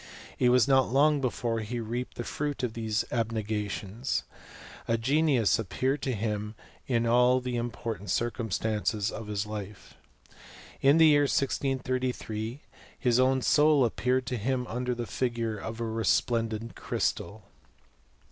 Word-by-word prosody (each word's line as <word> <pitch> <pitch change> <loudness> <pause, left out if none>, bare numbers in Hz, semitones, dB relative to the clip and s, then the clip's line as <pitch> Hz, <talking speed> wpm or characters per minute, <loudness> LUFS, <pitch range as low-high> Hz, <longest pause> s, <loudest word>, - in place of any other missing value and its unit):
■ - - -17 0.4
It 125 - +4
was 125 -2 +5
not 135 -1 +4
long 145 +2 +4
before 120 -3 -1
he 115 +3 -4
reaped 120 +3 -4
the 120 - -3
fruit 145 0 -3
of 120 -3 -1
these 110 -1 -1
abnega 110 -3 -1
tions. 110 +7 -3 0.6
A 115 - +2
genius 130 -2 +2
appeared 130 +7 -1
to 130 - -1
him 105 0 -3 0.3
in 120 -2 +1
all 125 +2 +4
the 125 -1 -4
important 115 -4 -4
chrcumstances 110 -2 -1
of 110 -1 -7
his 105 0 -2
life. 105 -2 -8 0.9
In 140 +3 +5
the 165 - +7
year 145 -2 +5
1 - - 0
633 130 -5 -1
r 135 - -14 0.4
his 125 -1 +2
own 130 0 +3
soul 150 -3 +5
appeared 125 +2 0
to 125 -1 -2
him 125 +3 -1
under 125 +1 -2
the 120 0 -4
figure 115 -3 -2
of 110 +3 -6
a - - -2
resplendent 115 0 0
crystal. 100 +4 -2
120 Hz, 150 wpm, -28 LUFS, 110-130 Hz, 0.9 s, the